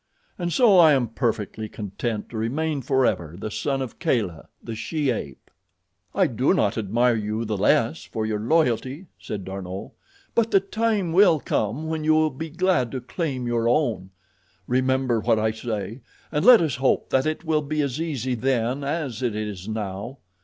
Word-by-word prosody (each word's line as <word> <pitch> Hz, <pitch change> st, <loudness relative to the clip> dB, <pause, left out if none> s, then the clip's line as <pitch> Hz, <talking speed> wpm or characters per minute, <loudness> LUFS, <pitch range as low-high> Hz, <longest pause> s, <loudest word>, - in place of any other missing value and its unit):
And 175 Hz, -1 st, -2 dB
so 210 Hz, -3 st, +5 dB
I 160 Hz, -3 st, +7 dB
am 125 Hz, -5 st, +1 dB
perfectly 110 Hz, -3 st, -2 dB
content 105 Hz, +2 st, -4 dB
to 115 Hz, -, -6 dB
remain 145 Hz, +6 st, -1 dB
forever 120 Hz, -, 0 dB
the 105 Hz, +2 st, -5 dB
son 135 Hz, +3 st, -1 dB
of 125 Hz, -, -9 dB
Kala, 95 Hz, -10 st, -1 dB, 0.2 s
the 115 Hz, -, -5 dB
she 140 Hz, +5 st, -1 dB
ape." 70 Hz, -, -6 dB, 0.6 s
"I -, -, +4 dB
do -, -, +1 dB
not -, -, +1 dB
admire 115 Hz, +4 st, +2 dB
you 110 Hz, +1 st, -2 dB
the 105 Hz, -1 st, -2 dB
less 95 Hz, -, +2 dB
for 110 Hz, -1 st, -4 dB
your 110 Hz, -1 st, -1 dB
loyalty," 135 Hz, -, 0 dB
said 100 Hz, -3 st, -6 dB
D'Arnot, 95 Hz, 0 st, -6 dB, 0.4 s
"but 230 Hz, -1 st, +2 dB
the 195 Hz, -, +5 dB
time 205 Hz, -3 st, -1 dB
will 180 Hz, -4 st, +6 dB
come 120 Hz, +4 st, -1 dB
when 160 Hz, -1 st, -2 dB
you 155 Hz, 0 st, +4 dB
will 155 Hz, 0 st, +3 dB
be 160 Hz, +5 st, -6 dB
glad 165 Hz, -7 st, +1 dB
to 130 Hz, -, -2 dB
claim 130 Hz, 0 st, -3 dB
your 120 Hz, -1 st, +1 dB
own. 120 Hz, -8 st, 0 dB, 0.6 s
Remember 130 Hz, 0 st, +1 dB
what 115 Hz, +1 st, +2 dB
I 110 Hz, 0 st, +1 dB
say, 110 Hz, +1 st, -5 dB, 0.3 s
and 150 Hz, 0 st, 0 dB
let 245 Hz, -4 st, +8 dB
us 155 Hz, -6 st, 0 dB
hope 135 Hz, 0 st, +1 dB
that 130 Hz, +2 st, +2 dB
it 155 Hz, +1 st, -2 dB
will 155 Hz, -1 st, +2 dB
be 150 Hz, +1 st, -1 dB
as 140 Hz, +2 st, -2 dB
easy 130 Hz, -6 st, -2 dB
then 125 Hz, +2 st, 0 dB
as 140 Hz, -5 st, -3 dB
it 120 Hz, -4 st, -1 dB
is 105 Hz, -3 st, -5 dB
now. 105 Hz, +3 st, -4 dB
125 Hz, 180 wpm, -24 LUFS, 110-155 Hz, 0.6 s, let